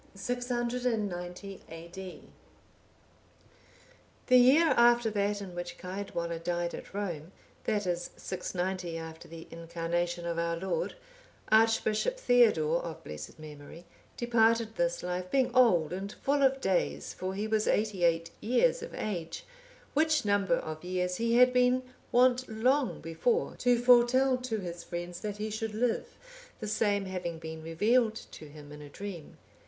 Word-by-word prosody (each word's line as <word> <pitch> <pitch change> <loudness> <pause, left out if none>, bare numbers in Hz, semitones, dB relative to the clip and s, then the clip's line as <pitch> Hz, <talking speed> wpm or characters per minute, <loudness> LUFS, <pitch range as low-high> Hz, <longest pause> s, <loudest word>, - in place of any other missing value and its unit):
[690 225 -5 -3
A.D.] 170 +3 -9 2.0
The 255 - +4
year 270 +7 +6
after 240 -1 +4
that 205 0 -1
in 185 -2 -9
which 175 0 -6
Caedwalla 180 -3 -4
died 175 0 -2
at - - -9
Rome, 175 -5 -4 0.3
that 210 -2 0
is, 175 -1 -2
690 180 -1 -3
after 160 0 -8
the 165 0 -10
Incarnation 170 +1 -3
of 170 -1 -2
our 170 0 0
Lord, 190 - -2 0.6
Archbishop 225 - +3
Theodore, 215 - +4
of 165 -2 -7
blessed 75 0 -8
memory, 155 +2 -11 0.3
departed 230 -1 +2
this 170 0 0
life, 180 0 -3
being 260 0 +1
old 200 -11 +4
and 195 +2 -4
full 280 +5 0
of 270 0 +3
days, 75 - -1
for 185 +1 -4
he 205 +2 -2
was 220 -1 +1
eighty 210 -4 +1
eight 165 0 +2
years 475 - +2
of 475 - -7
age; 170 -6 -4 0.5
which 310 -3 +2
number 205 +3 +2
of 155 -8 -6
years 180 0 -1
he 230 0 +1
had 250 +1 +6
been 250 +1 +3 0.3
wont 255 +1 +3
long 250 +4 +1
before 165 +9 0
to 245 0 +3
foretell 250 +2 +5
to 250 -3 -3
his 170 -1 -6
friends 175 0 -6
that 205 -1 -5
he 215 +1 -3
should 220 0 -4
live, 235 +1 -1 0.4
the 215 - -5
same 205 -1 +1
having 180 -3 -4
been 160 0 -7
revealed 215 +8 +2
to 160 - -10
him 145 -1 -12
in 150 0 -10
a 145 - -10
dream. 185 -2 -8
200 Hz, 145 wpm, -30 LUFS, 170-240 Hz, 2.0 s, year